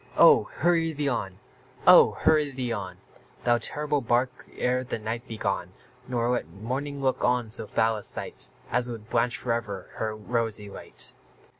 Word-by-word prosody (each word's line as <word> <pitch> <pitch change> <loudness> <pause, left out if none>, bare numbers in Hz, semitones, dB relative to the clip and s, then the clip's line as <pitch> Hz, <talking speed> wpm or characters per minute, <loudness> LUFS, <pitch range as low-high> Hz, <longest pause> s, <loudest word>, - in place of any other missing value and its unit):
Oh! - - +7
hurry 165 0 +2
thee 145 -1 -2
on 95 -7 -3 0.5
oh! - - +8
hurry 150 -2 +4
thee 125 -3 -3
on, 95 -4 -5 0.5
Thou 120 0 +3
terrible 150 +4 0
bark, 120 +2 0
ere 125 +1 +1
the 125 - -3
night 115 +3 -5
be 110 - -6
gone, 95 -3 -2 0.3
Nor 120 -1 0
let 125 - -1
morning 135 +7 -4
look 130 -1 +1
on 125 -3 +1
so 110 - 0
foul 110 +1 +1
a 105 - -8
sight - - -3 0.2
As 125 0 +1
would 115 -2 -8
blanch 115 -1 +2
for 120 - -1
ever 105 -5 -4
her 110 -1 -2
rosy 110 -2 -2
light! - - -4
120 Hz, 170 wpm, -27 LUFS, 110-130 Hz, 0.5 s, oh